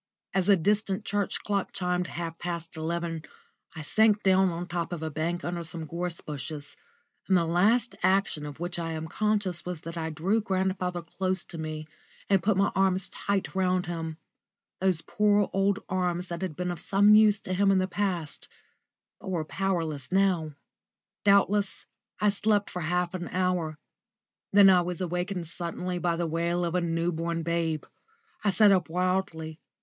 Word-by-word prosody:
As 190 0 +1
a 200 - +8
distant 205 +3 0
church 205 -1 -1
clock 200 -2 -1
chimed 180 -1 -1
half 165 -1 -5
past 170 -1 -5
eleven, 165 0 -3 0.5
I 160 - -6
sank 215 +5 +3
down 190 0 +4
at 170 -1 -4
the - - -3
top 175 -1 -3
of 170 -3 -4
a 160 - -3
bank 170 +4 -2
under 175 0 -2
some 165 -1 -6
gorse 170 +2 -4
bushes, 150 0 -7 0.5
and 190 - +4
the 170 - +2
last 210 +9 +2
action 185 -5 +2
of 145 +1 -9
which 175 0 -3
I 165 -1 -3
am 160 0 -4
conscious 205 -2 0
was 180 -3 -5
that 165 +1 -7
I 160 -1 -2
drew 185 +8 0
grandfather 185 -3 -1
close 185 +2 -2
to 165 - -8
me 155 -1 -5 0.4
and 195 -2 +5
put 200 +1 +2
my 195 +1 +3
arms 190 0 +2
tight 200 -1 -2
round 185 -1 +1
him 165 -2 -4 0.6
those 185 -3 +2
poor 205 -1 +2
old 195 +1 +2
arms 180 -1 -1
that 170 0 -4
had 185 -5 -3
been 180 +1 -2
of 175 - -5
some 205 +2 +5
use 210 -1 +6
to 185 - -4
him 195 +2 +3
in 195 - +4
the 185 0 +1
past, 185 -6 -3 0.7
but 200 - -8
were 170 -4 -1
powerless 160 -7 -2
now. 185 -5 +2 0.7
Doubtless 200 0 +3 0.3
I 210 - +4
slept 205 0 +2
for 180 - -4
half 175 +2 0
an 175 -2 -4
hour. 180 -4 -1 0.7
Then 200 0 +8
I 180 -1 +5
was 175 -1 -3
awakened 180 0 -2
suddenly 175 +2 -4
by 175 -1 +1
the 170 0 -1
wail 170 +2 0
of 170 - -2
a 180 - +2
new 170 0 0
born 165 0 -2
babe. 165 -2 -1 0.6
I 210 - +3
sat 200 +2 +5
up 185 -4 +2
wildly. 175 -3 -1
180 Hz, 180 wpm, -28 LUFS, 165-195 Hz, 0.7 s, a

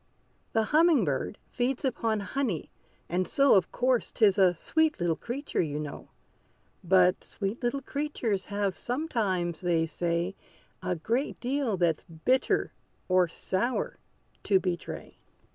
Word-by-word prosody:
The 225 - +3
humming 305 - +4
bird 145 +7 -2
feeds 255 +3 -1
upon 225 -4 0
honey; 200 - -2 0.4
and 180 +2 0
so, 275 -1 +4
Of 190 -3 +3
course, 250 -1 +1
'tis 205 -3 +3
a 185 -2 +5
sweet 315 - +1
little 170 -2 +1
creature, 260 - -3
you 150 -3 -2
know. 150 -2 -7 0.7
But 180 0 +4
sweet 200 +4 -4
little 265 +3 -1
creatures 255 -10 -2
have 200 -2 -1
sometimes, 210 - -1
they 170 -2 +2
say, 170 +3 -1 0.5
A 180 -1 -1
great 235 - -1
deal 255 -4 0
that's 170 -3 +1
bitter, 190 +11 +1 0.4
or 185 -1 +4
sour, 190 +8 -2 0.4
to 195 -2 +3
betray! 180 -2 -5
200 Hz, 130 wpm, -28 LUFS, 175-255 Hz, 0.7 s, a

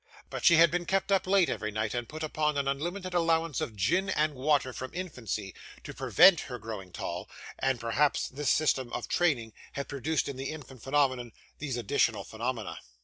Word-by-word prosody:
But - - -5
she 170 - +7
had 165 0 +6
been 175 0 -1
kept 195 +1 0
up 190 -1 +2
late 195 -2 +4
every 105 - -2
night, 110 0 -2
and 120 -2 -3
put 155 +1 -6
upon 150 -1 0
an 140 -1 0
unlimited 175 +7 -3
allowance 165 -3 +1
of 110 - -3
gin 180 - +1
and 155 -4 +1
water 135 -1 +1
from 130 +1 -5
infancy, 145 - -4 0.3
to - - -7
prevent 185 -5 +6
her 125 -3 -6
growing 105 -5 -7
tall, - - -5 0.3
and 135 -2 +1
perhaps 130 +6 +1
this 140 0 -2
system 130 -5 +2
of - - -3
training 125 -11 +1 0.2
had 140 - -4
produced 145 +3 -1
in 140 -2 -5
the 135 +1 -4
infant 140 -5 -9
phenomenon 130 -4 +1 0.3
these 135 -5 -3
additional 115 -3 +1
phenomena. 115 +1 -4
140 Hz, 190 wpm, -29 LUFS, 120-165 Hz, 0.3 s, she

